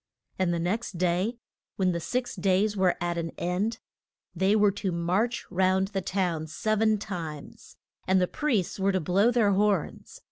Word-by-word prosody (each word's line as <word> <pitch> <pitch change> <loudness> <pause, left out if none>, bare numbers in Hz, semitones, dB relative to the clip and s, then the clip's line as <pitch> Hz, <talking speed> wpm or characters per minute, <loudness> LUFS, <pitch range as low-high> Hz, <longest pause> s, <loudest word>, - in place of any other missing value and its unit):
And 185 -2 +2
the 170 - 0
next 185 +3 -2
day 185 +6 0 0.4
when 185 -2 +1
the 170 - -2
six 250 +8 -3
days 195 +2 +1
were 185 -2 +2
at 175 0 -1
an 165 0 -3
end 195 +6 -1 0.6
they 195 +2 +3
were 205 -1 +4
to 195 -1 -3
march 185 +8 0
round 190 +1 +2
the 195 -1 -2
town 175 -4 -1
sev 215 +7 -1
en 220 -1 +3
times, 170 -8 -7 0.3
and 190 0 +4
the 180 - +2
priests 225 - -1
were 195 +1 +2
to 190 - +2
blow 190 +7 +3
their 230 -4 +3
horns. 200 -4 0
190 Hz, 175 wpm, -27 LUFS, 175-210 Hz, 0.6 s, were